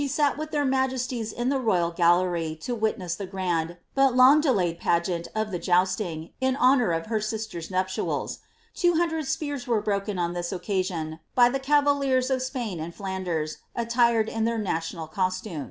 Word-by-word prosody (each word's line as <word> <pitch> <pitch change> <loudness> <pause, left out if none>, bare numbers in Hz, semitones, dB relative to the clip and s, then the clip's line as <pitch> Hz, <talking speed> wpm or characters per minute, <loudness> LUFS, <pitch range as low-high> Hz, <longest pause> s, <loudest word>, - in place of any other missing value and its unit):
sat 285 +1 +1
with 310 +1 -5
their 295 -2 0
majesties 260 -4 -1
in 240 +1 -2
the 275 -1 +1
royal 180 -8 +1
gallery 170 -2 +2
to 245 +8 -4
witness 215 -6 -1
the 195 +2 -5
grand, 175 -3 -2 0.2
Imi 270 -2 +4
long 260 +4 +7
delayed 185 - +1
pageant 170 0 0
of 215 -1 -1
the 180 - -2
jousting, 175 -2 0
in 260 0 +2
honour 255 -5 +4
of 165 -1 -1
her 220 -1 -1
sister's 215 -6 -4
nuptiaki 185 0 -2 0.3
Two 350 -2 +2
hundred 320 -3 0
spears 290 -5 -3
were 230 -3 +2
broken 205 -1 -2
on 175 -1 -1
this 175 -1 -3
occasion, 180 -4 -2 0.2
by 245 -1 +6
the 270 +2 -1
cavaliers 275 -2 +2
of 260 -1 +1
Spain 245 - -3
and 165 +2 -6
Flanders, 185 -6 -3 0.2
attired 235 -1 +2
in 225 0 -2
their 230 0 0
national 165 -5 -3
costume.' 185 +1 -2
215 Hz, 170 wpm, -26 LUFS, 175-255 Hz, 0.3 s, long